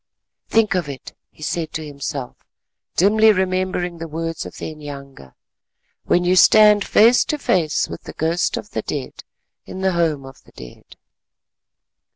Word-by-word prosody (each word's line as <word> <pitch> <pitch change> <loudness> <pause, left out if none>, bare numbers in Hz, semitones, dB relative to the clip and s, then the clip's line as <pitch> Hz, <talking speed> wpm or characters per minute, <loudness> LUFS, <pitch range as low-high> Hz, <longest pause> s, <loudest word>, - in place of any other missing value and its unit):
"Think 225 -3 +2
of 175 -6 -2
it," 135 -2 -9 0.2
he 155 - -14
said 165 0 -3
to 160 -1 -4
himself, 140 -2 -6 0.6
dimly 215 +4 +5
remembering 185 -2 -1
the 165 - -5
words 165 +1 -4
of - - -12
the - - -6
inyanga, 140 - -11 0.7
"when 175 - +2
you 180 +1 +2
stand 210 +1 +6
face 230 +5 +5
to 300 - -2
face 165 - 0
with - - -8
the - - -8
ghost 165 +3 -1
of - - -8
the - - -3
dead - - -6 0.4
in 190 - -7
the 190 0 +2
Home 160 -5 0
of 135 -1 -14
the - - -22
Dead." 60 -1 -13
170 Hz, 160 wpm, -20 LUFS, 150-190 Hz, 0.7 s, stand